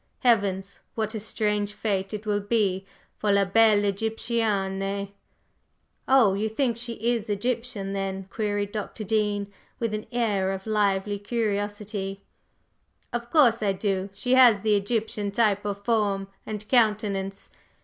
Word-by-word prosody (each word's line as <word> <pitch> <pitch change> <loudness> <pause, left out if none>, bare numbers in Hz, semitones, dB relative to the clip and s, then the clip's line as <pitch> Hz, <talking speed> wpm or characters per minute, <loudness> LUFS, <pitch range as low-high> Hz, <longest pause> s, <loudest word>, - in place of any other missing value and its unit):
Heavens, 200 -5 +1 0.2
what 220 0 -2
a 220 - -3
strange 210 -1 -1
fate 195 -3 -2
it 210 0 -5
will 205 -1 +1
be 200 -3 0 0.3
for 210 - +1
la 200 0 +4
belle 210 +1 +4
Egyptienne!" 200 -2 -1 1.0
"Oh, 255 -7 +5
you 210 +3 -1
think 235 +1 0
she 235 +1 -4
is 230 -1 -1
Egyptian 215 -2 -2
then?" 195 -1 -3
queried 205 -2 -1
Dr. 215 0 -5
Dean, 205 -1 0 0.2
with 230 -2 -2
an 215 0 -4
air 205 -6 +1
of 190 0 -6
lively 205 -2 +1
curiosity. 205 -2 -2 0.9
"Of 240 0 -3
course 240 -7 +5
I 200 -2 +2
do. 195 0 -1
She 250 +5 0
has 245 -6 +7
the 215 0 +3
Egyptian 210 0 -1
type 205 -1 +1
of 200 0 -4
form 205 -4 +1 0.2
and 210 -1 -5
countenance. 210 -5 +1
210 Hz, 140 wpm, -26 LUFS, 200-225 Hz, 1.0 s, has